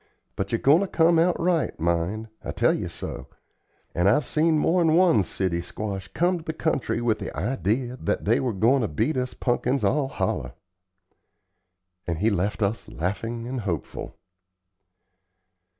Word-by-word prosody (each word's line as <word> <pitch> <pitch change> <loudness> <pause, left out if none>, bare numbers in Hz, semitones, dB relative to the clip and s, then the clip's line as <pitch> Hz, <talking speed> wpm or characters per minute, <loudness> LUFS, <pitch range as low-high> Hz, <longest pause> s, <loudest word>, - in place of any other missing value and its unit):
But 95 0 -3
ye're 115 - +2
goin' 140 +7 +5
to 200 - 0
come 165 -1 +3
out 175 +2 +2
right, 170 - 0
mind, 85 +6 -1 0.2
I - - -6
tell - - +3
ye - - -3
so; 65 - -7 0.7
and 90 +3 +3
I've 130 +7 +3
seen 155 +3 +2
mor'n 165 0 +3
one 175 - +5
city 90 -2 -2
squash 95 +2 -5
come 175 +1 0
to - - -12
the 160 - -4
country 155 -7 -1
with 115 -3 +1
the - - -5
idee 125 -1 0
that 120 -5 -3
they 115 +4 +3
were 130 -2 0
goin' 115 +7 +3
to 110 - 0
beat 110 - -1
us 125 0 -2
punkins 125 0 0
all 135 +7 +2
holler." 60 - -2 1.5
And 85 -2 -1
he 105 +6 +2
left 100 +3 -1
us 100 +3 -1
laughing 115 +7 -3
and 130 0 -3
hopeful. 90 -7 -5
115 Hz, 165 wpm, -25 LUFS, 100-150 Hz, 1.5 s, goin